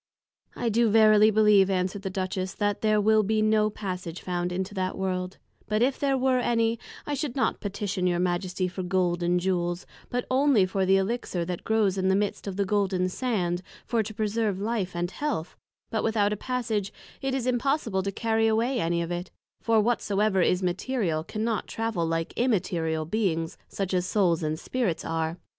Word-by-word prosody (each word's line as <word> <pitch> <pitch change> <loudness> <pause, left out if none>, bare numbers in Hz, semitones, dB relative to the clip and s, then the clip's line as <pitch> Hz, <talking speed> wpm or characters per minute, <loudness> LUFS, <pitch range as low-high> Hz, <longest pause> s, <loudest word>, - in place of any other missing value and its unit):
I 235 - -1
do 230 +1 +3
verily 215 0 +6
believe, 210 -2 +5
answered 190 +1 -1
the 195 - -3
Duchess, 185 0 -3
that 205 -1 -1
there 215 -1 +3
will 215 +1 +4
be 215 +1 +1
no 215 0 +3
Passage 185 -5 -5
found 180 -1 -2
into 190 +2 -3
that 185 -2 -2
World; 185 -1 -2 0.3
but 215 +2 +2
if 265 +1 +1
there 275 -1 +1
were 260 0 +2
any, 230 -1 +1 0.3
I 295 - -2
should 285 -3 -3
not 265 - 0
Petition 200 -2 -2
your 175 -1 +1
Majesty 180 +1 -1
for 185 +1 -5
Gold 180 -1 0
and 175 +1 +2
Jewels, 175 -1 -1 0.2
but 245 0 -2
only 260 -6 +4
for 190 0 -1
the 195 0 +5
Elixir 195 -3 -1
that 180 0 -4
grows 210 -4 +1
in 190 - +1
the 190 - +4
midst 205 0 -1
of 195 - -3
the 200 0 0
Golden 190 -2 +1
Sands, 185 -6 -1 0.2
for 230 -2 +1
to 215 0 -5
preserve 215 -2 -1
Life 205 -4 -2
and 175 +1 -2
Health; 290 - -3 0.4
but 220 - -1
without 210 -2 +2
a - - -1
Passage, 225 -4 -2 0.3
it 270 -1 -1
is 260 -3 -2
impossible 250 -5 0
to 195 +1 -2
carry 225 +2 +1
away 235 +4 +1
any 170 -1 0
of 170 - -5
it: 175 +1 -4 0.3
for, 225 -1 +3
whatsoever 210 -3 +1
is 180 +2 +2
Material, 180 -3 -1
cannot 220 +4 -2
travel 225 -7 -2
like 165 0 -2
Immaterial 175 -9 0
Beings, 165 -4 -1
such 195 -1 -3
as 180 0 +1
Souls 180 -6 +2
and 155 0 -1
Spirits 230 -9 -2
are. 165 +1 -2
200 Hz, 190 wpm, -27 LUFS, 180-225 Hz, 0.4 s, verily